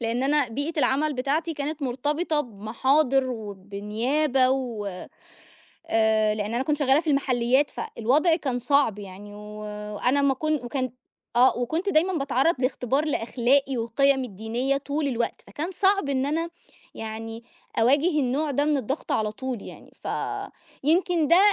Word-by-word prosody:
لإن 235 +2 -1
أنا 285 -2 +2
بيئة 285 +7 -3
العمل 285 +3 +2
بتاعتي 305 +6 -1
كانت 290 +1 -4
مُرتبطة 295 +5 0
بمحاضِر 260 +4 +1
وبنيابة 220 +6 0
و 245 -6 -2 1.0
آآ 220 -1 +3
لإن 210 +2 -3
أنا 250 - +1
كنت 295 +2 0
شغَّالة 275 0 +4
في 320 -2 -2
المحلِّيات، 265 0 +2
فالوضع 300 +9 +1
كان 260 -7 -2
صعب 250 -4 +2
يعني 205 +1 -10
وأنا 210 +5 -2
ما 275 -1 +3
كنت 305 -2 -1
وكان 255 0 -2 0.5
آه، 255 +2 +5
وكنت 320 - -1
دايمًا 370 +1 +3
باتعرّض 275 +4 +2
لاختبار 260 +2 0
لأخلاقي 265 0 +1
وقِيمي 265 +3 +2
الدينية 235 +6 -2
طُول 285 +1 -2
الوقت، 240 -2 -2
فكان 325 +5 -4
صعب 390 -3 +2
إن 270 0 0
أنا 330 +3 -1 0.4
يعني 225 +1 -6 0.4
أواجه 280 +8 +4
النوع 280 +4 0
ده 285 +1 +1
من 300 -1 +2
الضغط 270 +3 -3
على 215 -1 0
طُول 255 -2 -5
يعني، - - -12
ف - - -3 0.8
يمْكِن 335 -1 +2
ده 340 - +7
265 Hz, 140 wpm, -25 LUFS, 230-295 Hz, 1.0 s, ده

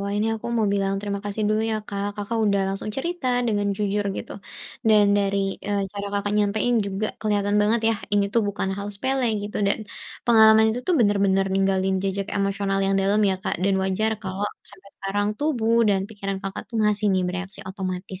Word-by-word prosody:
Wah, 200 - -3
ini 215 +2 +1
aku 220 - -7
mau 220 - +2
bilang 195 0 0
terima 200 -1 -3
kasih 205 +1 -3
dulu, 215 +1 +2
ya, 220 - 0
Kak, 200 +1 -3
Kakak 210 +3 -3
udah 200 -1 +2
langsung 195 +2 -3
cerita 340 -1 -3 0.2
dengan 205 -2 0
jujur, 205 0 0
gitu, - - -6 0.6
dan 210 -1 +6
dari, 200 0 +1 0.3
eee, 200 -1 0
cara 200 0 -5
Kakak 205 0 -1
nyampein 215 +4 +1
juga 200 +2 -2
kelihatan 205 -1 +1
banget, 220 +2 +2
yah, 210 - -4
ini 205 -1 +3
tuh 230 - +3
bukan 195 -1 -2
hal 200 +1 -4
sepele, 260 +4 0 0.2
gitu, 205 - -5
dan - - +1 0.5
pengalaman 220 -2 +7
itu 245 - -3
tuh 360 - +3
benar-benar 200 -3 +3
ninggalin 195 0 +1
jejak 195 0 -2
emosional 200 0 0
yang 195 0 +2
dalam, 200 +2 +2
ya, 190 - 0
Kak, - - -1
dan 195 0 +3
wajar 200 +4 0
kalau 190 +1 -3 0.3
sampai 200 0 -16
sekarang 205 +1 -1
tubuh 235 -7 +1
dan 195 -1 +3
pikiran 200 -2 -4
Kakak 195 0 -5
tuh 230 - -5
ngasih, 210 0 +2
nih, 185 - +2
bereaksi 190 +2 -5
otomatis, 190 -1 -4
205 Hz, 195 wpm, -24 LUFS, 195-215 Hz, 0.6 s, pengalaman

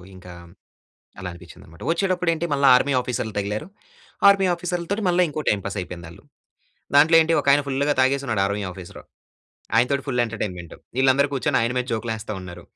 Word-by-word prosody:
ఇంకా 90 -1 -12 0.9
అలా 90 - -5
అనిపించిందన్నమాట. 85 0 -15
వచ్చేటప్పుడు 180 -1 0
ఏంటి 165 +1 -2
మళ్ళా 140 -1 +2
ఆర్మీ 140 +2 +1
ఆఫీసర్‌లు 120 -3 -4
తగిలారు. 105 +8 -3 0.6
ఆర్మీ 195 -1 +4
ఆఫీసర్‌ల 175 0 -4
తోటి 205 +2 -1
మళ్ళా 180 +1 +3
ఇంకో 155 0 -5
టైమ్ 100 -2 +1
పాస్ 100 - -5
అయిపోయింది 85 -1 -8
ఆళ్ళు. - - -15 0.7
దాంట్లో 155 +3 +6
ఏంటి 165 +1 +1
ఒకాయన 140 +1 +4
ఫుల్‌గా 140 +2 0
తాగేసున్నాడు 130 -5 +1
ఆర్మీ 100 +1 -2
ఆఫీసరు. 90 -2 -11 0.7
ఆయనతోటి 130 +4 +2
ఫుల్ 125 -3 0
ఎంటర్టైన్మెంటు. 95 -7 -6 0.2
వీళ్ళందరూ 135 +2 +3
కూర్చొని 135 - 0
ఆయన 115 +2 0
మీద 125 - 0
జోకులేస్తా 110 -1 -4
ఉన్నారు. 90 -1 -10
125 Hz, 160 wpm, -23 LUFS, 100-145 Hz, 0.9 s, దాంట్లో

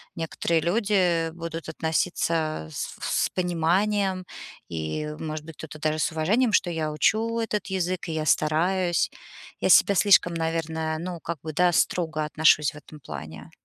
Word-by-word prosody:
некоторые 165 0 -1
люди 180 -3 +1
будут 165 -1 -6
относиться 160 - -1
с - - -5
в - - -5
с - - +1
пониманием 185 +2 +1 0.4
и, 80 - -3
может 155 -1 -5
быть, 160 -2 -10
кто-то 155 -1 -9
даже 155 +1 0
с - - 0
уважением, 215 +10 +1
что 180 - +3
я 155 -2 -2
учу 225 +8 +1
этот 210 -3 -2
язык, 185 -2 -2
и - - -2
я 155 -1 -2
стараюсь. 175 +4 +2 0.5
Я - - +1
к - - +9
себе 200 - +6
слишком, 185 -3 +5
наверное, 160 -1 -2
ну, 175 0 -5
как 170 0 -4
бы, 155 -1 -5
да, 180 +2 +3
строго 160 -2 0
отношусь 150 -1 +3
в - - -12
этом 150 +1 -13
плане. 80 - -9
165 Hz, 165 wpm, -25 LUFS, 155-185 Hz, 0.5 s, к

